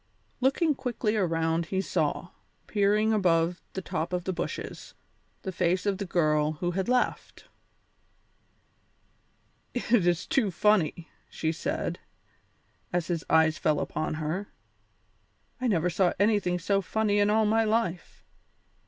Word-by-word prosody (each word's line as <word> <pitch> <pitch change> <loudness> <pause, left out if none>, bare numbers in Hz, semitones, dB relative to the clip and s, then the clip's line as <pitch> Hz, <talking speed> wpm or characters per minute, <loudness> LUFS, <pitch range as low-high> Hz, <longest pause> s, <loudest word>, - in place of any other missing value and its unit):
Looking 285 +5 +2
quickly 235 -5 -2
around, 165 -3 0
he 190 - -1
saw, 175 -2 -1 0.4
peering 210 +1 +2
above 175 -3 +2
the 190 - -4
tops 165 +2 -3
of 180 - -3
the 185 - -2
bushes, 175 - -6 0.5
the 190 - -3
face 180 +1 0
of 200 -1 0
the 200 - -3
girl 155 -3 +2
who 175 +3 -2
had 190 +4 -2
laughed. 250 0 -1 2.3
"It 235 -6 +2
is 175 0 +1
too 270 -10 +1
funny!" 175 -3 +1 0.2
she 160 - -2
said, 160 - -3 0.9
as 175 -1 -1
his 170 -2 -1
eyes 160 -1 +4
fell 155 -2 +2
upon 155 - -2
her. 160 +6 -3 1.1
"I 255 - +1
never 180 -5 +1
saw 180 +2 +2
anything 205 -4 +2
so 195 +3 +1
funny 205 +1 0
in 205 0 +3
all 215 +1 +3
my 225 +2 +3
life. 215 -6 -2
185 Hz, 135 wpm, -28 LUFS, 165-210 Hz, 2.3 s, eyes